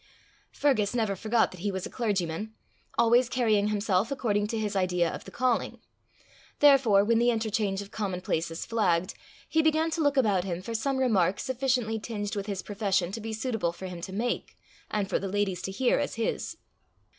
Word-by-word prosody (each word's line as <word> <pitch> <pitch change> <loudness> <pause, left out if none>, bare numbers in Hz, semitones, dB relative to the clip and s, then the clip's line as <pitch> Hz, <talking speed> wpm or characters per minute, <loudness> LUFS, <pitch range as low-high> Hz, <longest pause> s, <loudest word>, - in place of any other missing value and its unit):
Fergus 245 -7 +1
never 220 -4 0
forgot 220 +3 +1
that 185 - -11
he 200 +3 -1
was 190 -1 -4
a - - -6
clergyman, 210 -2 -2 0.4
always 235 +1 +4
carrying 220 -5 +2
himself 205 -1 +1
according 210 -6 0
to 225 - -3
his 210 -2 -2
idea 180 -2 +2
of - - -6
the - - -9
calling; 250 -2 0 0.8
therefore 260 -9 +6
when 230 +2 +3
the 240 +1 +4
interchange 215 -3 0
of 200 - -15
commonplaces 180 -5 -2
flagged, 185 -6 +1 0.3
he 320 - +2
began 315 +1 +2
to 325 - -1
look 285 -2 +2
about 205 -8 +3
him 175 -2 -3
for 230 +5 -6
some 265 +4 0
remark 200 -8 +2
sufficiently 250 -4 0
tinged 210 -2 -4
with 200 0 -3
his 195 -2 -3
profession 195 -4 0
to 225 +3 -5
be 225 +1 -5
suitable 220 -5 -1
for 180 +2 -9
him 180 -2 -6
to 190 - -6
make, 230 +5 -3 0.3
and 205 -2 -1
for - - 0
the 195 - -4
ladies 195 -2 -1
to - - -4
hear 245 +5 +2
as 285 - -2
his. 225 0 -2
215 Hz, 190 wpm, -28 LUFS, 195-235 Hz, 0.8 s, therefore